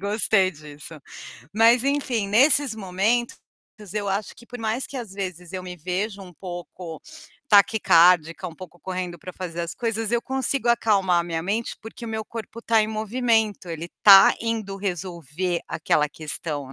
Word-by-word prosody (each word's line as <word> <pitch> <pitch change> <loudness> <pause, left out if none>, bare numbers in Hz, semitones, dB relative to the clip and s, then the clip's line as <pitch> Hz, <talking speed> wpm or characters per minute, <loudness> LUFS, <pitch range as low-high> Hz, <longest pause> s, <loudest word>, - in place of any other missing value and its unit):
Gostei 200 -1 +2
disso. 150 -1 -12 0.6
Mas, 230 +3 +5
enfim, 265 -7 0
nesses 265 +4 +4
momentos, 215 +4 -1 0.6
eu 205 -1 -2
acho 200 +2 -2
que 235 - -16
por 245 - -9
mais 225 +3 -2
que, 280 - -9
às 230 -6 -6
vezes, 185 -3 -6
eu 185 -1 -4
me 180 -1 -8
vejo 190 +5 -3
um 180 -2 -12
pouco 175 -1 -8 0.5
taquicárdica, 180 -5 +4
um 165 - -12
pouco 175 0 -12
correndo 180 -2 -5
pra 185 - -9
fazer 175 -2 -6
as 170 0 -4
coisas, 225 -2 -2
eu 235 - +2
consigo 265 -1 -1
acalmar 200 -7 +3
a 170 - -4
minha 165 -1 -3
mente, 215 +6 -2
porque 225 +2 -10
o - - -5
meu 220 -1 -3
corpo 230 0 -8
tá 225 -2 +3
em 215 - -2
movimento, 220 -2 0
ele 165 +1 -5
tá 200 -3 +9
indo 220 -4 -3
resolver 175 -3 -3
aquela 150 -1 +1
questão, 150 -2 -6
195 Hz, 165 wpm, -24 LUFS, 175-225 Hz, 0.6 s, tá